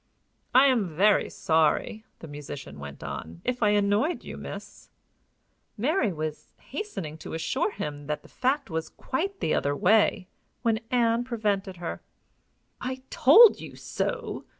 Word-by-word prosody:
"I 260 +2 +8
am 245 -8 +3
very 205 +4 +4
sorry," 160 +7 +1 0.2
the 165 - -8
musician 145 - -8
went 70 0 -9
on, 80 +1 -6
"if 250 -1 -1
I 210 - +4
annoyed 205 - +1
you, - - -7
miss." - - -9 0.9
Mary 245 - +1
was 155 -2 -5
hastening 180 - -6
to 160 - -6
assure 260 - 0
him 145 - -6
that 150 0 -3
the - - -15
fact 265 - -1
was 160 0 -3
quite 390 +9 -3
the - - +1
other 145 0 +1
way, 195 +1 +3 0.4
when 225 -2 +2
Ann 235 -1 +2
prevented 205 -6 -2
her. 170 -1 -5 0.8
"I 260 +1 -4
told 420 - +8
you - - -9
so!" - - -3
210 Hz, 145 wpm, -27 LUFS, 160-255 Hz, 0.9 s, I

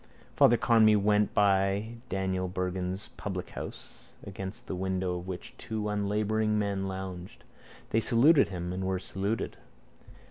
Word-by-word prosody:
Father 120 - +6
Conmee 110 -2 +5
went 105 +1 +3
by 100 +3 +2
Daniel 95 -1 -1
Bergin's 90 +2 -3
publichouse 95 -3 -7
against 95 0 -7
the - - -5
window 95 -1 -1
of 90 - -10
which 90 -2 -6
two 110 -1 -3
unlabouring 105 +1 0
men 100 -2 -1
lounged. 95 -1 -7 0.5
They 115 - +3
saluted 135 +7 +5
him 90 -1 -4
and 95 +1 -3
were 95 0 0
saluted. 100 +4 -3
95 Hz, 130 wpm, -29 LUFS, 95-105 Hz, 0.5 s, Father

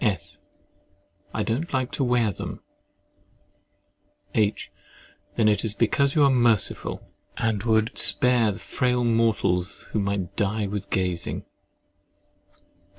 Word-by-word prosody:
S. 105 -6 -2 0.9
I 110 - -2
do 115 +4 -1
not 165 0 -7
like 130 -1 -1
to 140 - -1
wear 120 -4 +2
them. - - -7 1.7
H. 105 -1 0 0.6
Then 115 - +2
that 105 -1 +3
is 110 -2 -1
because 140 +6 +1
you 150 - +5
are 140 - +6
merciful, 120 -5 0 0.3
and 110 -3 0
would 110 0 +1
spare 120 -5 +4
frail 125 +2 -1
mortals 110 -5 +1
who 110 - 0
might 100 -2 -2
die 105 +1 0
with 100 0 -5
gazing. 90 -2 -2
110 Hz, 120 wpm, -25 LUFS, 100-120 Hz, 1.7 s, are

